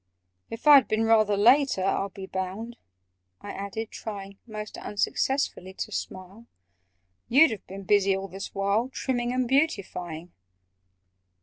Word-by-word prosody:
"If 230 +4 -8
I'd 290 -3 +8
been 215 +1 +1
rather 215 -2 +3
later, 245 -1 +4
I'll 195 +1 0
Be 190 0 -9
bound," 190 +6 -5 0.6
I 205 - -8
added, 200 +3 -5
trying 200 -2 -8
(Most 215 -1 -7
unsuccessfully) 205 -3 -1
to 215 - -5
smile, 195 +4 -7 0.8
"You'd 285 +4 +6
have 220 - -7
been 195 +1 -8
busy 195 0 +3
all 195 0 -5
this 195 +1 -8
while, 200 +5 +1
Trimming 245 -2 -2
and 255 0 0
beautifying?" 185 - -1
210 Hz, 130 wpm, -26 LUFS, 195-240 Hz, 0.8 s, I'd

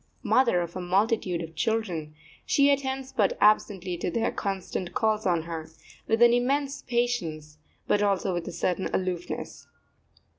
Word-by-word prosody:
Mother 235 -9 +3
of 170 0 -5
a 185 - -3
multitude 185 -1 +1
of 165 0 -9
children, 175 -7 -2 0.3
she 280 0 +4
attends 265 -1 -2
but 205 -4 +1
absently 190 -4 +2
to 175 - -2
their 225 +5 0
constant 190 -2 -4
calls 215 -2 +1
on 170 -3 +1
her, 165 -1 -6 0.4
with 225 +1 +4
an 240 0 +7
immense 275 +3 0
patience, 170 -12 -2 0.3
but 205 - +2
also 195 -2 +1
with 175 -1 -3
a - - -4
certain 180 +2 -1
aloofness. 180 -2 -4
195 Hz, 150 wpm, -27 LUFS, 175-235 Hz, 0.4 s, an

